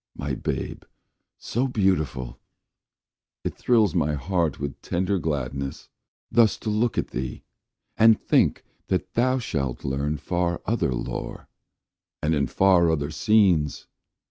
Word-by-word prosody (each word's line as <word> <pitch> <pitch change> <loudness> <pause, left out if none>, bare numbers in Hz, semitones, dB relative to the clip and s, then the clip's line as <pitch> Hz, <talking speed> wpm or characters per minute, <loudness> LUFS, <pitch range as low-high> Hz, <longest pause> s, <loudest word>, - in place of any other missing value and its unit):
My - - -3
babe - - -3 0.6
so 125 +4 -1
beautiful! 85 - 0 1.0
it - - -2
thrills 110 -8 +3
my 75 +1 +1
heart 85 +1 -1
With 70 -1 -5
tender 95 +2 0
gladness, 70 -3 -3 0.4
thus 115 -3 +4
to 110 - -2
look 110 +3 0
at - - -1
thee, 65 0 -4 0.5
And 110 0 +6
think - - +2 0.2
that - - -1
thou 130 +2 +2
shalt 70 - -3
learn 70 +3 -1
far 85 +3 -1
other 110 - 0
lore, - - -5 0.7
And 75 +2 0
in 70 -3 +1
far 90 +2 +4
other 75 -2 -1
scenes! 90 -5 +2
85 Hz, 125 wpm, -25 LUFS, 70-105 Hz, 1.0 s, And